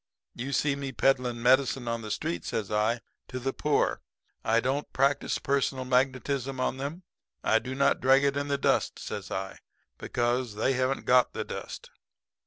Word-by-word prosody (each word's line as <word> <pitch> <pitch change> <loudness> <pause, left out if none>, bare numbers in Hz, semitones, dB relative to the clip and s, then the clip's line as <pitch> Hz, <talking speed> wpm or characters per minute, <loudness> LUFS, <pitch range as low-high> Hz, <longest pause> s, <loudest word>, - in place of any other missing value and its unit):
You 130 +4 -5
see 140 +1 +1
me 140 -1 -4
peddling 125 -3 +1
medicine 130 0 +3
on 115 0 -1
the 110 - -7
street,' 85 -4 -2
says 105 -3 -3
I, 110 +3 +1 0.3
'to 130 - -6
the 135 +1 -2
poor. 150 -1 +1 0.4
I 115 +1 +3
don't 135 +4 -1
practice 140 +1 +1
personal 135 -1 0
magnetism 130 +1 0
on 130 0 0
them. 145 +7 -5 0.4
I 110 - +4
do 130 +3 -6
not 140 +1 +2
drag 135 +2 +5
it 140 -1 +2
in 140 0 -1
the 140 0 0
dust,' - - +1
says - - -6
I, 95 0 -4 0.4
'because 120 -2 -1
they 120 +5 +1
haven't 130 +1 0
got 125 0 +4
the - - -2
dust.' - - -7
130 Hz, 175 wpm, -28 LUFS, 120-140 Hz, 0.4 s, drag